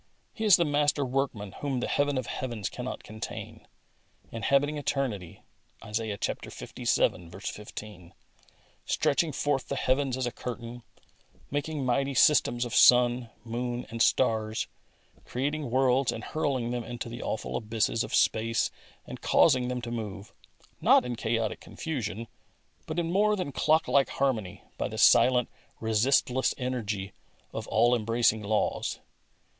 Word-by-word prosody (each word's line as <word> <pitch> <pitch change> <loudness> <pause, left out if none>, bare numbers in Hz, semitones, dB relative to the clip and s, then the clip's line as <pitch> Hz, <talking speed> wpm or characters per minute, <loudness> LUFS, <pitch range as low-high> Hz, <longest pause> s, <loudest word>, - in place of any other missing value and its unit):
He 220 - -3
is 205 -4 +8
the 170 - +2
Master 145 -1 +2
Workman 125 -6 -2
whom 140 -3 -1
the - - -2
Heaven 145 -1 +1
of 130 - -2
heavens 120 -6 -4
cannot 125 +1 -6
contain, 110 0 -8 0.6
inhabiting 140 +6 +1
eternity 125 - -3 0.4
{Isaiah 105 -1 -3
Ivii. 85 -2 -1 0.2
15), 105 -4 -8 0.7
stretching 155 +3 +1
forth 140 -1 -1
the 140 - -2
heavens 130 0 +1
as 130 - -1
a 120 - -2
curtain, 120 0 -7 0.7
making 145 0 -2
mighty 135 +2 0
systems 120 -5 +4
of 120 - -6
sun, 125 -1 +5
moon 120 +1 -3
and 115 0 -3
stars, 110 -3 +2 0.6
creating 145 +2 -2
worlds 130 +1 +3
and 115 - -6
hurling 130 -5 -1
them 120 -1 -2
into 120 0 -6
the 120 +1 -7
awful 110 - -3
abysses 110 0 0
of - - -3
space 115 +1 +2 0.3
and - - -9
causing 130 -5 +4
them 125 -1 -3
to 120 - -5
move, 105 -3 -6 0.5
not - - +5
in 125 -1 -3
chaotic 115 -1 -1
confusion, 115 -7 -5 0.6
but 160 - -4
in 170 -1 0
more 210 +3 +3
than 180 -8 -3
clock 155 +4 +2
like 140 -1 +3
harmony, 110 -9 -1 0.2
by - - 0
the - - -7
silent, 125 -1 +5 0.3
resistless 125 +3 +2
energy 110 -6 -3 0.4
of - - -5
all 120 +3 +3
embracing 115 -1 +2
laws. 105 +1 -1
125 Hz, 140 wpm, -28 LUFS, 110-140 Hz, 0.7 s, is